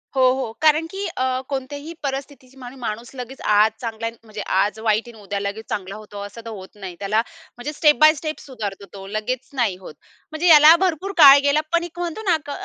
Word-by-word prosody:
हो, 265 - +2
हो. 260 -4 -3
कारण 310 +1 +4
की 395 +1 -4
अ, 255 0 0
कोणत्याही 285 +4 -5
परिस्थितीत 270 -1 -6 0.2
माणूस 230 0 -5
लगेच 255 +1 -8
आज 210 +1 +4
चांगला, 230 -1 -4
म्हणजे 215 -1 -8
आज 205 +3 +1
वाईट 220 +1 0
आहे, 225 -3 -13
उद्या 200 0 -3
लगेच 200 +2 -5
चांगला 195 0 -4
होतो 210 -1 -10
असं 205 +3 -10
तर 230 - -6
होत 190 -3 -9
नाही. 190 -4 -8
त्याला 210 +2 +1 0.4
म्हणजे 285 +5 -5
स्टेप 300 0 +4
बाय 310 0 +7
स्टेप 310 +1 -5
सुधारतो 205 -7 -7
तो, 195 -1 -9
लगेच 225 +5 -4
नाही 235 -8 0
होत. 180 -5 -11 0.4
म्हणजे 315 +3 -1
याला 310 0 +9
भरपूर 370 +2 0
काळ 280 -3 +10
गेला, 285 +2 +3
पण 340 0 +3
एक 345 0 -9
म्हणतो 350 +4 -4
ना - - +5
अ, 290 - -6
250 Hz, 205 wpm, -21 LUFS, 210-300 Hz, 0.4 s, काळ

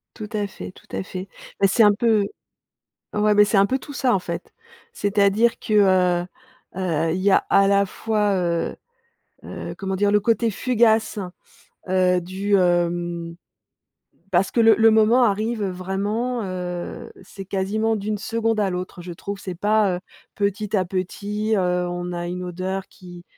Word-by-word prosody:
Tout 210 -1 -7
à 205 -1 -1
fait, 90 - -9
tout - - -19
à 95 - -2
fait. 185 - -7 0.3
Mais, 195 - +6
c'est 225 +4 +4
un 205 -1 +6
peu 220 -1 +2 0.9
ouais, 210 0 +3
mais 210 0 +6
c'est 205 - +1
un 195 - +6
peu 260 +6 0
tout 285 - -10
ça, 255 -2 +1
en 195 - +2
fait. 170 -1 -6 0.4
C'est-à-dire, 205 - +2
que, 215 - -3
heu, 185 -4 +3 0.5
heu, 165 -3 0
il 180 - -2
y 200 +1 +3
a, - - +6
à 195 0 +5
la 200 0 +3
fois, 210 +1 -1
heu, 170 -2 -1 0.7
heu, - - -7
comment 190 -1 -3
dire? 200 +1 +2
Le 210 - +4
côté 230 +2 +1
fugace, 225 -1 +2 0.7
heu, 185 -1 +3
du, 190 +3 0
hem, 175 -2 0 0.9
parce 185 +1 +2
que 235 - +2
le 225 -2 +6
le 225 +1 +6
moment 220 +3 +4
arrive 215 +1 0
vraiment, 200 +6 -2
heu, 180 -2 -5
c'est 195 +1 -10
quasiment 205 +4 -1
d'une 210 +1 -3
seconde 225 +1 -1
à 200 -2 +1
l'autre, 180 0 -5
je 175 0 -7
trouve, 200 +4 -6
c'est 185 -2 -6
pas, 205 -1 +2
heu, - - -7 0.4
petit 205 +1 -1
à 185 - +2
petit, 205 +4 -2
heu, 180 -1 0
on 175 0 -4
a 175 0 -4
une 180 +1 -4
odeur 185 +2 -4
qui 175 -1 -13
195 Hz, 170 wpm, -22 LUFS, 180-215 Hz, 0.9 s, Mais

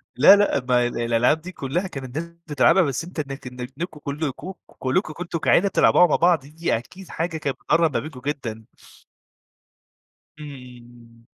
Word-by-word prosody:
لا، 150 +10 +8
لأ، 200 -10 +1
ما 125 -1 +3
الألعاب 120 +5 +1
دي 180 +3 -8
كلّها 175 +4 -3
كانت 135 -4 -7
الناس 170 +1 -4 0.2
بتلعبها، 150 +5 +4
بس 140 0 -2
أنت 175 -1 -8
إنك 135 -2 -5
إنك 125 0 -7
نكو 165 -2 -5
كلّكم 150 +5 -4
كلّكم 135 +4 -2
كنتم 170 -1 -5
كعيلة 200 +5 +3
تلعبوها 180 - +5
مع 150 - +2
بعض، 175 -1 +4
دي 155 -3 -1
أكيد 180 +10 -12
حاجة 165 0 -3
كانت 145 -3 -3
بتقرّب 165 -1 +2
ما - - +1
بينكم 140 -4 -9
جدًا. 115 -7 -4 1.7
إمم. 120 -4 -13
145 Hz, 160 wpm, -23 LUFS, 125-170 Hz, 1.7 s, لا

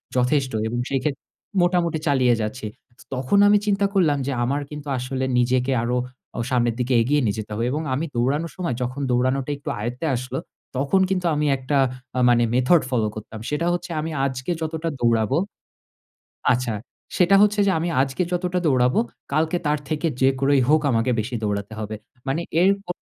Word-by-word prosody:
যথেষ্ট 130 +1 +2 0.2
এবং 120 +2 -2
সেক্ষেত্রে 135 +1 -2 0.4
মোটামুটি 175 -2 +1
চালিয়ে 130 -4 +4
যাচ্ছি। 110 +2 -4 0.3
চ - - -14
তখন 130 +9 +1
আমি 205 0 +6
চিন্তা 200 -1 +2
করলাম 165 -7 +3
যে - - 0
আমার 140 +4 0
কিন্তু 150 -1 -8
আসলে 130 +1 -2
নিজেকে 125 +2 +2
আরো 125 +1 0 0.4
অ - - -2
সামনের 120 -3 +1
দিকে 125 +1 0
এগিয়ে 145 +5 +2
নিয়ে 100 -2 0
যেতে 105 0 -7
হবে। 115 +3 -1
এবং 150 +3 -1
আমি 145 +5 -1
দৌড়ানোর 140 +7 0
সময় 175 -10 -2
যখন 130 +3 -3
দৌড়ানোটা 130 +3 +1
একটু 145 +2 -7
আয়ত্তে 120 +8 -3
আসলো 130 +2 -4 0.4
তখন 145 +8 +2
কিন্তু 185 -2 -1
আমি 150 0 0
একটা 130 +2 -1 0.4
আ - - +2
মানে 120 0 +4
মেথড 130 +7 +4
ফলো 115 -5 +1
করতাম। 110 +1 -8
সেটা 150 +3 -1
হচ্ছে 175 +1 -4
যে - - -4
আমি 160 +1 -4
আজকে 130 +3 -3
যতটা 160 +1 -2
দৌড়াবো 115 +2 +2 1.2
আচ্ছা 125 -2 -1 0.4
সেটা 185 +2 +5
হচ্ছে 210 0 +3
যে - - +4
আমি 170 +2 -1
আজকে 135 +5 -1
যতটা 180 0 0
দৌড়াবো, 125 -3 +3 0.3
কালকে 160 +3 +1
তার 150 0 +1
থেকে 155 +1 0
যে 130 - +6
করেই 135 0 +3
হোক 155 +1 +5
আমাকে 115 +1 +1
বেশি 115 +4 -3
দৌড়াতে 100 0 -2
হবে। 110 0 -4 0.3
মানে 140 +5 0 0.2
এর 185 - +5 0.2
ক - - -49
135 Hz, 180 wpm, -23 LUFS, 125-160 Hz, 1.2 s, আমি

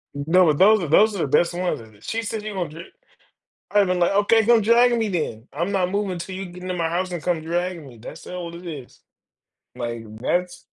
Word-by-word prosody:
N 140 - -3
no, 180 +2 +5
but 150 -2 +2
those 210 +1 +6
are 165 - -2
those 210 +7 +4
are - - -4
the 145 - 0
best 170 +5 +2
ones, 180 -8 -2 0.2
she 225 - -2
said 220 -1 -4
you 215 - -5
gonna 180 -5 -3
dri 165 +3 -11 0.8
I'd 205 -1 +4
been 180 -1 0
like, 175 - +3
"Okay, 205 +3 +3
come 235 +1 +5
drag 235 +2 +4
me 225 - 0
then, 140 - -3
I'm 170 +7 -2
not 185 -2 0
moving 200 -3 -2
'til 185 +2 -6
you 195 +1 -5
get 180 0 -11
into 185 - -3
my 165 -2 -1
house 180 +2 -2
and 175 -3 -4
come 175 -3 0
dragging 170 -1 -3
me, 120 -3 -13
that's 110 - -11
all 175 -2 -6
it 175 +1 -11
is." 145 -7 -9 0.8
Like, 120 -2 -5
that's 180 +9 -2
180 Hz, 235 wpm, -23 LUFS, 165-200 Hz, 0.8 s, those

